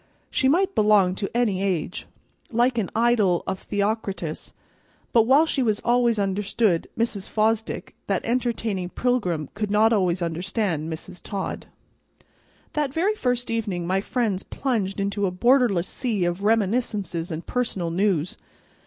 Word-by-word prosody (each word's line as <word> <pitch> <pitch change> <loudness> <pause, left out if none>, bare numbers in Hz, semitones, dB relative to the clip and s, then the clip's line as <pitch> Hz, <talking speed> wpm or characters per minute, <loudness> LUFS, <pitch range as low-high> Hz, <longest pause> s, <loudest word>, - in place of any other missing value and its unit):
She 265 - +2
might 370 +7 +3
belong 210 - +4
to 195 +1 -3
any 210 -6 +1
age, 180 -3 -2 0.4
like 240 +1 +2
an 200 - -1
idyl 220 -6 +3
of 190 - -3
Theocritus; 200 -5 -2 0.6
but 230 -1 +5
while 280 +5 +6
she 295 -4 -1 0.2
always 240 -1 +3
understood 200 -1 +1
Mrs. 220 -4 -1
Fosdick, 220 +1 0
that - - -1
entertaining 230 -6 -1
pilgrim 180 - -1
could 210 0 -3
not 215 +2 +4
always 180 -4 +1
understand 170 -1 -2
Mrs. 180 +3 -8
Todd. 195 -2 -5 1.1
That 295 -3 0
very 360 +9 +1
first 245 - -1
evening 205 -7 -2
my 190 +2 +1
friends 215 -4 -1
plunged 215 -8 -2
into 200 0 0
a - - -2
borderless 235 -3 +3
sea 220 -8 -1
of 175 +3 -2
reminiscences 205 -5 0
and 160 +1 -5
personal 200 -9 -2
news. 185 -2 0
210 Hz, 135 wpm, -24 LUFS, 185-235 Hz, 1.1 s, while